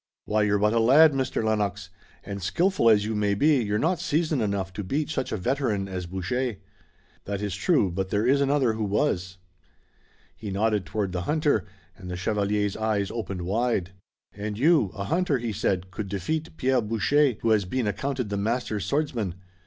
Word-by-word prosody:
Why, 105 0 +1
you're 105 -1 +2
but 105 +2 +2
a 115 - +3
lad, 145 +7 +6
Mr. 130 -4 -1
Lennox, 105 -3 -1 0.3
and 100 0 -6
skillful 175 - +2
as 105 -2 +4
you 110 - -2
may 105 -1 +1
be 145 +4 +3
you're 105 0 0
not 165 +7 +1
seasoned 155 -3 0
enough 100 -3 -2
to 105 - -4
beat 145 - -2
such 135 -4 -2
a - - -1
veteran 115 -3 -1
as 90 -2 -5
Boucher!" 105 +7 -2 0.7
"That 100 -1 -3
is 100 -3 -2
true, 100 - +2
but 95 +2 -3
there 105 +3 0
is 140 +3 +3
another 140 -4 +2
who 110 0 -3
was." 95 -3 -1 1.0
He 105 - -7
nodded 105 0 0
toward 100 -3 -2
the 90 -1 -2
hunter 150 - +2 0.3
and 90 -1 -10
the 90 - -4
chevalier's 105 +1 0
eyes 110 -3 -1
opened 95 -6 -4
wide. 100 -1 0 0.4
"And 105 0 -5
you, 145 - +4
a 100 - -4
hunter," 160 - +1
he 115 -2 -3
said, 95 -1 -1
"could 100 +1 -5
defeat 155 - -3
Pierre 130 -1 +2
Boucher, 120 +5 +2
who 115 - +2
has 105 -3 +3
been 125 +6 -1
accounted 125 +3 -2
the 100 - -2
master 110 +1 -1
swordsman! 115 - -1
105 Hz, 185 wpm, -26 LUFS, 100-130 Hz, 1.0 s, lad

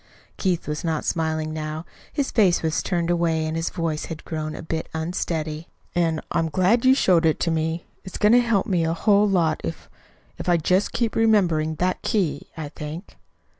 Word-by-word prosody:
Keith 180 -4 -1
was 150 0 -3
not 160 -2 -1
smiling 160 -1 -1
now. 155 +1 -4 0.3
His 280 -2 -1
face 195 -8 +3
was 160 0 0
turned 175 -2 -1
away 165 -2 +1
and 155 0 -2
his 165 0 -1
voice 160 -2 -2
had 165 -1 -8
grown 155 -1 -4
a - - -7
bit 160 0 -3
unsteady. 160 -1 -3 0.3
"And 165 -2 +1
I'm 165 -1 +1
glad 190 - +2
you 260 +1 +7
showed 180 -9 +4
it 160 -1 +2
to 170 - +1
me. 160 +1 -1 0.2
It's 190 - -7
going 210 0 +4
to 245 - +7
help 230 -5 +1
me 180 -7 +1
a 165 0 +1
whole 205 +3 +3
lot 170 -5 +1
if 80 - -6 0.5
if - - -3
I'll 175 - +5
just 180 +5 +1
keep 235 -3 0
remembering 175 -9 +3
that 180 +3 -1
key, 175 -9 -1
I 155 -2 -5
think." 150 +5 -8
165 Hz, 195 wpm, -23 LUFS, 155-185 Hz, 0.5 s, you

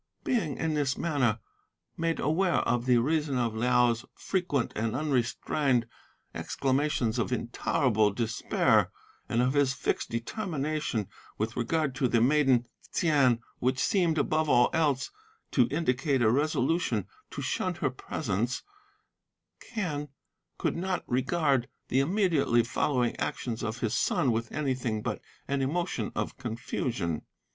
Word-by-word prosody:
"Being 205 - 0
in 160 -1 -1
this 145 -3 0
manner 140 -9 +1 0.6
made 165 0 -1
aware 170 +5 +2
of 120 +1 0
the 125 -1 +5
reason 150 +2 +1
of 120 -3 0
Liao's 120 +1 +2
frequent 175 -9 -1
and 110 +1 -1
unrestrained 130 -2 +1 0.5
exclamations 135 -4 0
of 120 - -1
intolerable 120 -2 +1
despair, 110 +2 +2 0.4
and 120 +2 +2
of 130 +1 +1
his 140 -3 +2
fixed 135 - -1
determination 145 - -2 0.3
with 110 +2 -2
regard 140 +4 0
to 135 -2 +2
the 120 -1 +2
maiden 130 -1 +4 0.3
Ts'ain 140 -8 +3 0.2
(which 130 +1 +1
seemed, 175 - +2
above 155 +1 +1
all 120 -2 +5
else, 145 -5 +1 0.4
to 125 -4 +4
indicate 135 -3 +1
a 110 - +5
resolution 140 - +1 0.2
to - - -6
shun 185 -1 -1
her 145 -4 -1
presence) 120 -3 -2 1.1
Quen 155 -10 -2 0.5
could - - -1
not 185 +1 -2
regard 135 0 +1 0.2
the 130 - +3
immediately 155 - +3
following 120 +1 0
actions 115 -3 -3
of 110 +1 -4
his 115 -1 0
son 130 - +2
with 115 0 -2
anything 130 -7 -1
but - - -3 0.3
an 140 0 0
emotion 150 - -1
of 105 - -3
confusion. 120 - -2
130 Hz, 130 wpm, -29 LUFS, 120-155 Hz, 1.1 s, the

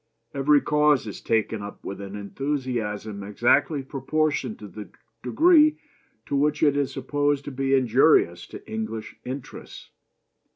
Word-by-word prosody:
Every 140 +1 +3
cause 150 -3 +2
is 105 - -7
taken 110 -1 0
up 100 0 -9
with 100 +1 -6
an 100 0 -7
enthusiasm 110 -3 -4
exactly 120 +8 +1
proportioned 155 - -1
to - - -10
the - - -10 0.3
degree 310 -3 +4 0.5
in 140 - 0
which 150 +1 +1
it 145 -2 +4
is 145 -2 0
supposed 145 +1 -1
to 145 - -5
be 135 +1 +1
injurious 125 - +3
to - - -11
English 110 0 -5
interests. 130 +1 -8
135 Hz, 135 wpm, -25 LUFS, 110-145 Hz, 0.5 s, degree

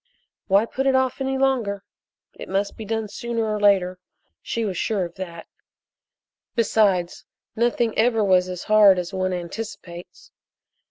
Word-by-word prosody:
Why 200 +2 +4
put 270 +3 -2
it 265 - +3
off 260 0 0
any 265 0 -1
longer? 240 -7 0 0.5
It - - -10
must 195 +1 -1
be 220 - -8
done 220 0 -2
sooner 230 +2 -3
or 215 -1 -2
later 185 -3 +3 0.4
she 230 -1 -3
was 195 -3 -3
sure 195 0 -1
of 170 - -9
that. 170 -3 -8 1.1
Besides, 200 -6 +1 0.3
nothing 235 0 +1
ever 225 -1 +3
was 185 -2 +3
as 180 -1 -6
hard 210 -3 +6
as 180 +1 -4
one 185 0 -1
anticipates. 175 -1 -8
205 Hz, 150 wpm, -23 LUFS, 185-230 Hz, 1.1 s, hard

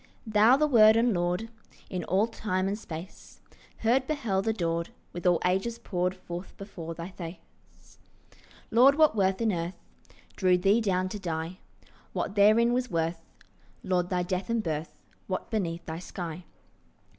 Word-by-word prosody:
Thou 220 +4 +5
the 305 - +3
Word 220 -6 +7
and 230 0 +3
Lord 180 +5 -1 0.4
In 180 -2 -4
all 195 +4 +2
time 195 -4 -2
and 200 - -1
space 170 0 -9 0.4
Heard, 255 +4 +2
beheld, 225 -10 -1
adored, 170 -6 -1 0.2
With 175 +1 -2
all 175 -1 +4
ages 195 +6 0
poured 180 -3 -2
Forth 180 0 -8
before 170 -5 -7
thy 170 +3 -7
face, 170 -2 -12 0.7
Lord, 255 +5 +6
what 310 -5 +4
worth 190 0 +1
in 225 -2 +2
earth 170 +1 -3 0.6
Drew 185 -2 +3
thee 200 +5 +3
down 185 -3 +1
to 210 - -5
die? 165 0 -4 0.5
What - - -2
therein 215 +4 +5
was 250 0 0
worth, 165 0 -1 0.6
Lord, 180 -2 0
thy 180 -1 0
death 185 +2 -3
and 230 -1 0
birth? 160 -1 -4 0.3
What 185 +4 -4
beneath 170 -6 -2
thy 160 0 -5
sky? 175 -1 -7
190 Hz, 155 wpm, -28 LUFS, 175-220 Hz, 0.7 s, Word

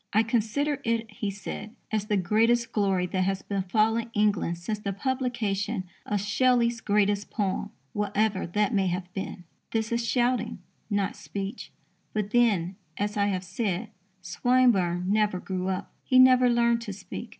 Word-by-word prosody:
"I 215 +2 +5
consider 245 +6 0
it," 230 -1 -1
he 210 0 -3
said, 210 +2 -7 0.2
"as 215 -1 -1
the 210 -2 +2
greatest 230 +5 +2
glory 195 -3 +1
that 185 +1 -1
has 195 +1 -1
befallen 215 +4 +1
England 205 -5 +1
since 205 +5 -4
the 200 -1 -3
publication 225 -4 -1 0.2
of 205 - 0
Shelley's 235 +2 +2
greatest 205 -1 +1
poem, 200 -1 -1 0.2
whatever 210 -1 0
that 205 +4 +1
may 195 -2 +2
have 180 0 -3
been." 190 -1 -5 0.3
This 220 0 -1
is 235 0 0
shouting, 245 0 +1 0.3
not 200 -2 0
speech. 195 +1 -6 0.4
But 210 -1 -2
then, 200 -7 +2 0.2
as 205 +1 -1
I 200 -1 +2
have 190 -2 -1
said, 195 +2 -2 0.3
Swinburne 185 -2 +2
never 210 -2 +2
grew 185 0 -3
up. 190 -1 -3
He 255 - +3
never 255 -1 +7
learned 235 -1 +3
to 210 -4 -5
speak. 195 +4 -8
210 Hz, 155 wpm, -27 LUFS, 195-230 Hz, 0.4 s, never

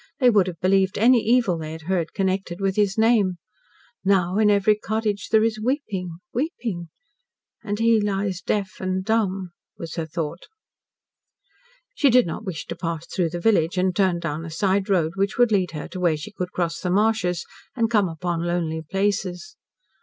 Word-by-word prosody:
They 250 -3 +5
would 200 -4 +4
have 170 -3 -6
believed 190 0 +2
any 240 +3 +5
evil 230 -7 +2
they 155 0 -6
had 160 0 -9
heard 170 -1 -1
connected 190 -2 -1
with 195 -1 0
his 205 -1 +1
name. 220 -5 +3 0.7
Now, 190 0 +2
in 215 -1 +4
every 205 +1 +4
cottage, 210 -1 -2
there 220 0 +4
is 220 -1 0
weeping 205 - -2 0.2
weeping. 230 - -3 0.7
And 205 -1 -2
he 230 0 +3
lies 195 -2 -1
deaf 200 -2 -2
and 185 0 -2
dumb," 195 -5 0 0.3
was 165 -1 -7
her 165 -1 -2
thought. 165 +1 -5 1.5
She 285 - +3
did 250 0 +5
not 170 +6 -5
wish 185 -7 -5
to - - -6
pass 165 -2 -4
through 175 -3 -1
the 175 +2 -5
village, 180 -3 +2
and 185 0 +1
turned 185 -3 +2
down 165 -1 -3
a 165 - -6
side 190 +4 0
road, 170 -5 +2
which 195 +1 0
would 245 -2 +4
lead 190 -4 +2
her 150 - -5
to 185 - -7
where 170 -4 +2
she 155 +8 -8
could 180 -3 -5
cross 170 -2 -2
the 180 - -3
marshes, 190 -3 +1 0.3
and 230 -2 +1
come 205 -5 +3
upon 165 +1 -3
lonely 170 -2 -1
places. 195 - -2
190 Hz, 185 wpm, -23 LUFS, 175-215 Hz, 1.5 s, They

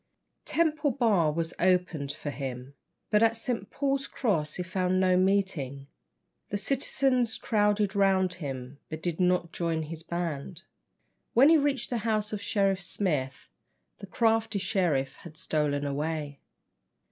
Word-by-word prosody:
Temple 310 -2 +1
Bar 215 - +2
was 165 +1 -2
opened 180 -6 +1
for 145 0 -5
him; 130 -1 -6 0.4
but 210 0 +4
at 225 0 +4
St. 230 -3 -3
Paul's 275 -1 -1
Cross 165 - -1
he 180 - -2
found 185 +1 0
no 185 -1 +4
meeting. 185 -8 0 0.6
The 205 - -1
citizens 255 0 +1
crowded 210 -2 +1
round 190 -2 +3
him, 135 -1 -6
but 155 0 -6
did 175 -1 -2
not 180 -2 +2
join 165 -2 -1
his 160 +1 -7
band. 170 -1 -4 0.7
When 265 +5 +7
he 325 - +7
reached 280 -2 -1
the 240 - 0
house 215 -1 0
of 205 - -3
Sheriff 195 -2 +1
Smith, 150 -8 -2 0.5
the 200 - -9
crafty 225 +1 +1
Sheriff 180 -9 0
had 170 -6 -12
stolen 145 -2 0
away. 145 0 -3
185 Hz, 140 wpm, -28 LUFS, 155-220 Hz, 0.7 s, When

